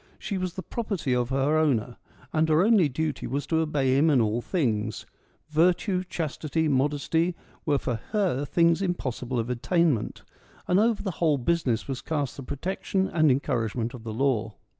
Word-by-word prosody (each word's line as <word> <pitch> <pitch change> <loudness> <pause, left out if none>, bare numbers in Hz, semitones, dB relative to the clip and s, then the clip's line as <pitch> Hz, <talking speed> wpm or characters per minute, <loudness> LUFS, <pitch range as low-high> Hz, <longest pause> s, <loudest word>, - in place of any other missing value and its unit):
She 200 -3 -3
was 185 -1 -3
the 185 - -5
property 195 - -2
of 125 -1 0
her 135 +3 +2
owner, 125 -6 +1 0.4
and 160 0 +2
her 155 +3 +4
only 205 -8 +4
duty 155 +3 -2
was 140 +2 -2
to 160 - +1
obey 145 -5 +1
him 150 +4 +4
in 140 -4 +4
all 110 +1 +1
things: 110 - -1 0.4
virtue, 180 +4 +2
chastity, 160 -2 -2
modesty, 150 +5 +1 0.3
were 145 -2 +3
for 125 -4 -2
her 190 - +1
things 170 +4 +2
impossible 130 -9 -2
of 115 +1 -1
attainment; 145 - 0 0.4
and 180 +2 +3
over 225 0 +2
the 195 - -1
whole 155 -4 +3
business 130 -4 0
was 135 -2 -4
cast 145 -4 -2
the - - -7
protection 190 +7 -2
and 155 -2 +3
en 135 +1 +3
couragement 120 -3 -2
of 120 -3 -9
the 115 - -5
law. 115 -3 0
150 Hz, 175 wpm, -26 LUFS, 125-170 Hz, 0.4 s, her